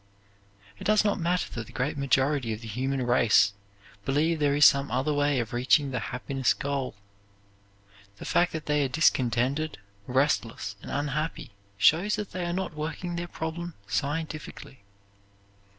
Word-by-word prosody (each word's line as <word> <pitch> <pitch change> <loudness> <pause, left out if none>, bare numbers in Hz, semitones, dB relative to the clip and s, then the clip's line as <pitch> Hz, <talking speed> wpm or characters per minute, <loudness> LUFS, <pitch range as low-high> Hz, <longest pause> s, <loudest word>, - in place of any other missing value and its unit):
It - - -8
does 215 0 +4
not 205 0 +1
matter 175 +1 0
that 115 -2 -5
the - - -13
great 135 +5 -2
majority 140 -2 +1
of 110 - -7
the 115 - -8
human 130 +4 -2
race 120 -4 +4 0.5
believe 155 +6 +1
there 145 -1 +2
is 145 0 +6
some 140 0 +5
other 130 +4 0
way 145 -2 +2
of 115 -1 -4
reaching 135 +3 +3
the 125 - -1
happiness 130 +1 0
goal. 140 -4 -3 1.2
The - - -9
fact 175 0 +2
that 160 -2 -5
they 150 -1 +2
are - - +1
discontented, 130 +1 +1 0.3
restless, 125 -6 0
and - - -9
unhappy 150 +1 -3 0.3
shows 175 - +4
that 210 -2 -5
they 180 -1 -3
are - - -1
not 185 -1 -3
working 165 +3 -4
their 175 0 -3
problem 170 +1 -5
scientifically. 150 +3 -4
145 Hz, 155 wpm, -27 LUFS, 130-160 Hz, 1.2 s, is